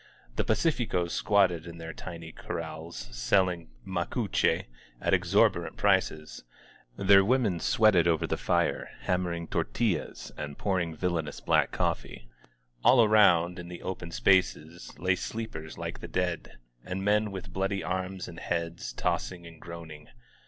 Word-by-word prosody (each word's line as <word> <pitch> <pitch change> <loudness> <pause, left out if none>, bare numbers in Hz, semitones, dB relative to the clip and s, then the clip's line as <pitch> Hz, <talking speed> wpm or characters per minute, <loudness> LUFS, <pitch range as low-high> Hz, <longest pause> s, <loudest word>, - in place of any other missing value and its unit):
The - - +1
pa - - +2
cificog 110 - 0
squatted 90 -5 +2
in 85 0 -9
their 80 -1 -7
tiny 85 -2 -8
corrals, 80 -4 -6
selling 90 +4 +1 0.2
macuche 95 +4 0 0.3
at - - 0
exorbitant - - +2
prices; 75 0 +1 0.5
their 100 0 +6
women 110 -5 +2
sweated 95 -2 +4
over 80 -1 +2
the - - -1
fire, - - 0
hammering 90 -2 -1
tortillas 85 - -2
and 70 -1 -6
pouring 90 -5 -1
villainous 85 -4 -2
black - - +2
coffee. - - -2 0.6
An 130 - +6
around, 95 -6 +5
in 90 - -7
the 90 0 -9
open 90 -2 -5
spaces, 85 -2 +1
lay 90 0 +2
sleepers 90 -7 -6
like - - -5
the - - -7
dead, 90 -2 -2 0.3
and 95 +1 -4
men 105 +1 +3
with 95 -1 -8
bloody 95 +1 -1
arms 95 +1 -3
and 85 -1 -9
heads, 85 -6 -3
tossing 85 +7 -2
and 85 -1 -13
groaning. 80 -3 -9
90 Hz, 140 wpm, -29 LUFS, 85-95 Hz, 0.6 s, their